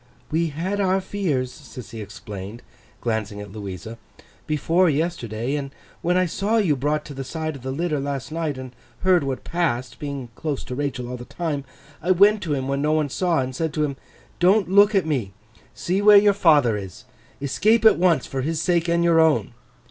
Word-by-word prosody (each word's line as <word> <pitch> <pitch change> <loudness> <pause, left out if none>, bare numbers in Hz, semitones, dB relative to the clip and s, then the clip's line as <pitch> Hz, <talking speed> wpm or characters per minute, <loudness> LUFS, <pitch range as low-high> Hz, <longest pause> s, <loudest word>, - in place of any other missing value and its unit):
'We 165 +2 +1
had 175 +7 -3
our 190 -1 +2
fears,' 175 -10 -2
Sissy 125 -6 -10
explained, 105 +1 -8 0.4
glancing 110 -3 -2
at 105 -1 -8
Louisa, 105 +2 -7 0.5
'before 165 +4 +2
yesterday; 135 -6 -2
and 140 -2 -2 0.3
when 180 +1 +1
I 185 - +3
saw 200 +6 0
you 185 -9 +2
brought 150 +3 -1
to 150 - -8
the 135 0 -5
side 155 +2 -4
of 135 - -10
the 130 - -5
litter 155 +2 -1
last 140 0 -4
night, 160 -4 -2
and 130 -1 -7 0.3
heard 185 -4 +4
what 135 -2 -3
passed 130 -8 -2
(being 140 -4 -5
close 150 +2 -4
to - - -7
Rachael 130 -2 -3
all 125 0 -5
the 120 - -9
time), 150 -4 -3 0.4
I 175 - -4
went 200 +3 +5
to 155 -6 -1
him 130 -1 -3
when 140 0 -1
no 150 +1 +2
one 155 -2 +1
saw, 170 0 +1
and 130 0 -4
said 160 +1 -2
to 155 - +1
him, 140 -2 -2 0.4
"Don't 185 +1 +3
look 205 +2 +6
at 190 - +3
me. 125 -11 -2 0.4
See 185 +3 -1
where 205 0 +8
your 205 0 +5
father 150 - +4
is. 95 +1 -7 0.4
Escape 215 - +2
at 220 - +7
once, 175 -3 +3
for 135 - -3
his 155 +4 -1
sake 170 0 +1
and 170 0 +2
your 170 -1 +4
own!" 160 -6 +3
150 Hz, 200 wpm, -23 LUFS, 130-175 Hz, 0.5 s, where